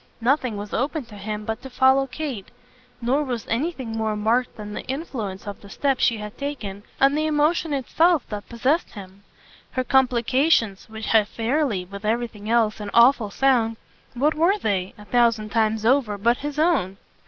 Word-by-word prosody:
Nothing 250 -2 +1
was 205 0 -7
open 280 +3 -1
to 220 -2 -13
him 210 +1 -5
but 220 +1 -3
to 265 - -9
follow 265 +1 +3
Kate, 255 -6 -5 0.6
nor 270 +5 +2
was 245 -6 -4
anything 260 -1 -2
more 220 -1 -1
marked 230 +4 0
than 210 -1 -7
the - - -4
influence 235 - -5
of 205 -1 -7
the 200 - -13
step 270 +4 0
she 230 - +2
had 210 0 -7
taken 225 -9 -5 0.2
on 275 +1 +5
the 310 +1 0
emotion 310 +2 +1
itself 315 +3 +2
that 210 -1 -6
possessed 260 +8 0
him. 195 -1 -11 0.5
Her 255 - 0
complications, 255 -4 +2
which 220 0 -7
had 215 -2 +3
fairly, 230 -4 -1
with 200 +3 -10
everything 220 -1 -2
else, 225 -2 +2
an 205 -1 -5
awful 235 -2 +5
sound 230 -2 +2 0.4
what 290 +6 +2
were 340 +6 +2
they, 195 - -2
a 210 - -13
thousand 230 -2 +2
times 220 0 +1
over, 235 -4 +2
but 235 +4 +2
his 295 0 -5
own? 305 - +1
235 Hz, 175 wpm, -23 LUFS, 210-275 Hz, 0.6 s, on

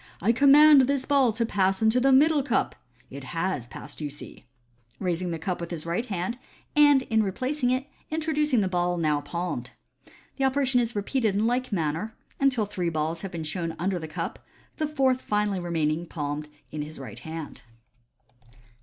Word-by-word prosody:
" - - -30
I 210 +6 +3
command 280 +1 +7
this 280 -1 0
ball 275 -4 +3
to 230 +2 0
pass 195 -3 +1
into 220 +3 +3
the 270 +2 +3
middle 295 +3 +5
cup. 260 -4 0 0.4
It 140 +1 -8
has 165 -2 -2
passed, 135 +5 -9
you 150 - -2
see 145 -2 -10 0.3
" 120 0 -33
(raising 180 -1 -1
the 165 - -2
cup 175 +2 -3
with 170 - -5
the 170 - -4
right 180 +9 -1
hand, 200 +5 -3 0.4
and 290 -3 +6
in 220 -3 +1
replac 255 +9 -2
ing 245 - +3
it, 255 +2 0 0.2
introducing 300 -5 +1
the 195 - +1
ball 175 -1 0
now 155 -3 +1
palmed). 170 +4 -4 0.7
The 270 - -1
operation 265 -1 +2
is 235 -1 -3
repeated 215 0 0
in 210 +2 +1
like 250 +2 0
manner, 170 +4 -2 0.2
until 260 -6 +2
three 185 -4 -2
balls 160 +1 -2
have 195 - -6
been 165 -3 -5
shown 165 +1 -3
under 185 +2 -1
the 160 - -6
cup, 155 - -5 0.3
the 310 - 0
fourth 265 -4 +1
finally 210 -2 0
remaining 165 -1 -1
palmed 150 -1 -4 0.2
in 155 - -4
the 150 +1 -6
right 125 -6 -8
hand. 160 -1 -7
195 Hz, 190 wpm, -26 LUFS, 165-255 Hz, 0.7 s, command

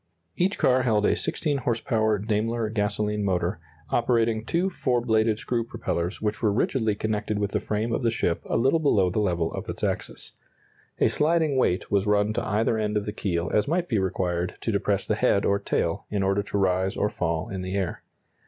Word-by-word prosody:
Each 190 +3 +1
car 130 0 +3
held 110 -4 +2
a - - +3
16 145 -3 -1
horse 120 -2 -1
power 110 -3 +1
Daimler 110 +2 -1
gasoline 105 -1 -1
motor, 90 -3 0 0.3
operating 115 -2 +2
two 175 +9 0
four 130 -7 0
bladed 110 -2 +2
screw 115 +1 -1
propellers 105 -6 -3
which 105 +1 -1
were 110 -3 +3
rigidly 110 0 +1
connected 105 0 -2
with 100 -1 -1
the - - 0
frame 110 +2 -2
of - - 0
the 120 - +2
ship 115 -7 -1
a - - 0
little 135 +8 +3
below 100 - +3
the 105 - 0
level 85 -5 0
of - - -6
its - - -6
axis. - - -3 0.7
A - - +4
sliding 155 -1 +2
weight 95 -8 +1
was 100 0 +2
run 105 +1 +2
to - - -1
either 110 +2 +1
end 105 0 0
of 105 - -2
the 105 - -4
keel 85 -5 -2
as 105 - +2
might 175 +3 0
be 110 -8 +1
required 90 -2 -1
to - - -1
depress - - 0
the - - 0
head 100 - +2
or 100 0 +2
tail, 85 +1 -1
in 100 -2 -1
order 100 +1 +2
to 100 0 -3
rise 95 0 +1
or 105 - +1
fall 85 +4 -2
in 95 -3 -4
the 95 +1 -4
air. 95 -4 -2
105 Hz, 210 wpm, -26 LUFS, 100-115 Hz, 0.7 s, A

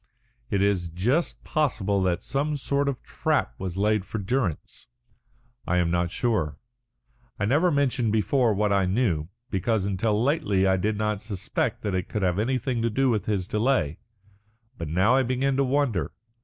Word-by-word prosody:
It 100 -2 +1
is 95 -4 +1
just 115 - -1
possible 105 - 0
that 90 -2 0
some 145 +3 -1
sort 140 +1 0
of 135 - -5
trap - - -1
was 95 -1 -4
laid 105 0 +2
for 110 - -5
Durrance. 100 - -3 0.8
I 90 - +2
am 85 -1 +2
not 85 0 +1
sure. 105 - -1 0.8
I 100 - +1
never 150 - +3
mentioned 135 -6 +1
before 115 +3 +2
what 105 0 +1
I 95 -2 +2
knew, 90 -7 0 0.2
because 100 +1 0
until 105 +2 0
lately 105 - +2
I 95 0 +4
did 105 +3 -1
not 105 -1 -1
suspect 105 -4 -2
that 105 - -1
it 95 -1 -2
could 105 - -2
have 90 +1 +1
anything 125 +1 0
to 115 - +1
do 130 +3 +2
with 110 -3 -1
his 100 -4 -1
delay. 105 - 0 0.8
But 85 - -5
now 95 +9 +3
I 135 - +4
begin 130 +2 0
to 140 - +3
wonder. 130 - 0
105 Hz, 170 wpm, -26 LUFS, 95-130 Hz, 0.8 s, I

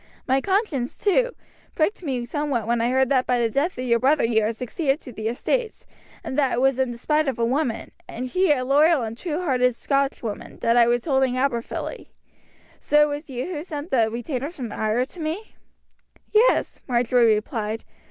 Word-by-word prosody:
My 265 +1 +2
conscience, 380 - -1
too, 485 +5 +1 0.4
pricked 340 +6 0
me 260 -7 -2
somewhat 275 -3 -2
when 235 0 +1
I 235 - +1
heard 260 0 +2
that 260 -2 +2
by 250 - +2
the 230 -1 +1
death 290 +8 0
of 255 - -3
your 235 -1 +3
brother 280 +5 +3
you 225 -1 +3
had 220 +2 -1
succeeded 270 +5 -1
to 255 - -10
the 220 -1 -4
estates, 445 - -2 0.4
and 260 - -2
that 270 -3 +2
it 235 - 0
was 265 0 +2
in 260 -1 +1
despite 300 +6 0
of 265 - -1
a 230 - +1
woman, 255 -1 -1 0.2
and 250 +2 -5
she 365 +5 +2
a 255 -3 +1
loyal 290 +1 +4
and 225 0 -4
true 335 +5 -3
hearted 250 -5 +2
Scotswoman, 275 -5 -2
that 230 0 +3
I 235 -1 +6
was 240 0 +1
holding 265 -4 +2
Aberfilly. 255 -3 -2 0.7
So 300 0 +4
it 295 -1 0
was 295 +1 -7
you 285 +5 -4
sent 310 -1 -6
the 225 -4 +3
retainers 260 +7 -4
from 245 -7 -5
Ayr 220 +4 0
to 340 - -11
me?" 330 +7 -4 0.8
"Yes," 445 +3 +3
Marjory 240 -2 +3
replied. 215 +1 -3
260 Hz, 190 wpm, -23 LUFS, 235-300 Hz, 0.8 s, I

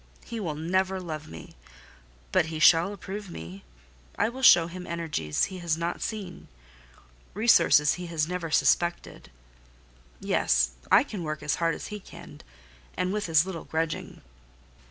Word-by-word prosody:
He 230 -1 -6
will 165 -7 -3
never 185 +4 0
love 155 -4 -6
me; 80 -2 -11 0.8
but 160 - +2
he 160 -1 -5
shall 165 +4 +5
approve 200 0 -7
me; 85 - -9 0.5
I 205 - +2
will 260 +3 -8
show 175 -9 +7
him 180 +1 -8
energies 160 - -2
he 190 -1 -3
has 170 -2 -1
not 170 +1 -2
yet - - -17
seen, 200 -5 -6 0.9
resources 170 -9 +5
he 180 0 -6
has 160 -2 -1
never 180 -2 -4
suspected. 170 +3 0 0.9
Yes, - - +1 0.2
I - - +7
can 200 - -7
work 155 -1 -5
as 150 - -1
hard 165 -2 +1
as - - -8
he 210 - -5
can, - - -13 0.6
and 180 +1 -1
with 210 -4 -3
as 160 +1 +4
little 190 -4 -6
grudging. 160 0 -4
170 Hz, 155 wpm, -27 LUFS, 155-190 Hz, 0.9 s, show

